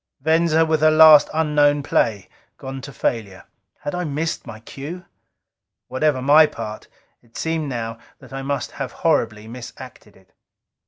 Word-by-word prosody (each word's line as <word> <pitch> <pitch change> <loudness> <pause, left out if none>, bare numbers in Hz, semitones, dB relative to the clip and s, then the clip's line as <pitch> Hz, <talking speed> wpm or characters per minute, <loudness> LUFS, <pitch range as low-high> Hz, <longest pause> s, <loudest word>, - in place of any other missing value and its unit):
Venza, 160 +2 +2
with 160 -1 0
her 155 - +6
last 155 -1 +7
unknown 150 -2 +2
play, 105 -8 0 0.3
gone 135 0 -7
to 140 - -9
failure. 110 -6 -3 0.4
Had 145 - -5
I 180 0 -2
missed 160 +1 -3
my 110 -2 -9
cue? 150 +10 -9 0.8
Whatever 130 -1 0
my 150 +3 +6
part, 110 -5 -8 0.3
it 115 -1 -16
seemed 160 -2 -2
now 115 -3 -5 0.2
that - - -15
I 135 - -5
must 140 -1 -3
have 135 -3 -6
horribly 110 -9 +1
misacted 120 -2 -11
it. 95 -1 -26
140 Hz, 150 wpm, -21 LUFS, 115-155 Hz, 0.8 s, last